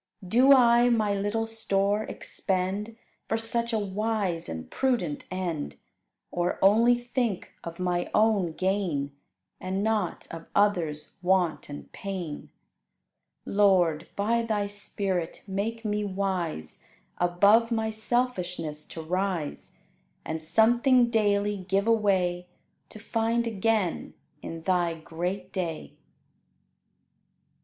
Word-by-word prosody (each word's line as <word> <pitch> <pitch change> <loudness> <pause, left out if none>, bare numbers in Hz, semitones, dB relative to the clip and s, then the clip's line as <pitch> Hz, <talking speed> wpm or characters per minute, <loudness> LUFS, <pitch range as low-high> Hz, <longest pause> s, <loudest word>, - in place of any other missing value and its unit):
Do 250 +8 +5
I 240 -2 +6
my 215 -4 +2
little 205 +3 -1
store 210 -2 0
expend 195 +4 -3 0.3
For 225 - 0
such 235 +1 -1
a 225 - +1
wise 205 -3 -1
and 80 0 -6
prudent 235 - 0
end; 180 -5 -3 0.6
Or 175 0 -1
only 225 +5 +5
think 240 -4 -2
of 170 0 -7
my 180 -1 -1
own 210 -6 +2
gain, 180 -7 -1 0.5
And 190 +2 -2
not 215 -5 -1
of 165 0 -8
others' 175 -7 +1
want 180 -4 +1
and 145 - -9
pain? 185 -6 -6 1.0
Lord, 180 -6 +3
by 225 +4 +1
Thy 215 -3 -1
Spirit, 200 -4 -3
make 220 +4 -3
me 210 0 0
wise 185 - -3 0.4
Above 200 +6 +4
my 220 -1 0
selfishness 180 -10 -1
to 165 - -7
rise, 180 -2 -2 0.5
And 160 0 -3
something 235 - +4
daily 205 -2 +2
give 195 +2 0
away 190 -6 +2 0.4
To - - -10
find 230 +2 0
again 215 -4 0 0.3
in 165 0 -7
Thy 175 -2 +1
great 170 +4 -5
day! 165 - -4
200 Hz, 110 wpm, -27 LUFS, 175-225 Hz, 1.0 s, I